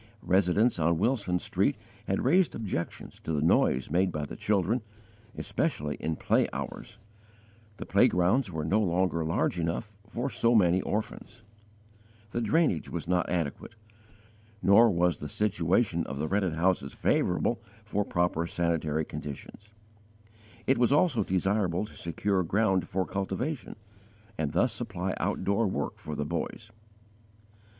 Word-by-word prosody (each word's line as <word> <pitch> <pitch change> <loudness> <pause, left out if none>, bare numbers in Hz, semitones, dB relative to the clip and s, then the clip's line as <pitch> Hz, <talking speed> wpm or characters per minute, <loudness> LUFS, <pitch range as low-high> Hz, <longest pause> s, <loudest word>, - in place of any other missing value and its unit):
Residents 95 +4 +3
on 85 +1 +2
Wilson 100 -3 +1
Street - - 0 0.3
had - - 0
raised 175 +7 +3
objections 95 -6 -5
to 80 - -3
the 75 - 0
noise 65 -4 +2
made 90 +3 +2
by 75 -2 -3
the - - -8
children, 105 +4 +1 0.6
especially 75 0 -1
in 80 0 -2
play - - +2
hours; - - -6 0.8
the - - -6
playgrounds 95 +5 +3
were 80 -2 -3
no 100 +7 +2
longer 90 -3 +1
large 85 +2 0
enough 100 +5 -3
for 120 +4 -3
so 120 -3 +2
many 90 -3 +4
orphans; 110 +2 -4 0.9
the 120 - -1
drainage 120 - +1
was - - -5
not 90 -1 +1
adequate, 85 - -3 0.9
nor 110 +4 +7
was 90 -4 +1
the 75 - -6
situation 90 -2 +1
of 65 - -5
the 75 +2 -2
rented 95 -3 0
houses 85 -4 +1
favourable, 115 +6 +1 0.2
for 105 -1 0
proper 85 -3 0
sanitary 80 -3 0
conditions; 75 +10 -8 1.0
it 135 - +2
was 120 0 +3
also 145 -3 +3
desirable 95 0 0
to - - -13
secure 95 +3 -1
ground 95 0 +1
for 95 0 0
cultivation, 100 - -3 0.6
and 75 -2 -2
thus - - +2
supply - - -3
outdoor 100 +2 0
work 95 - -3
for 75 - -6
the 75 - -2
boys, 95 +7 -4
etc. - - -30
95 Hz, 140 wpm, -29 LUFS, 85-105 Hz, 1.0 s, nor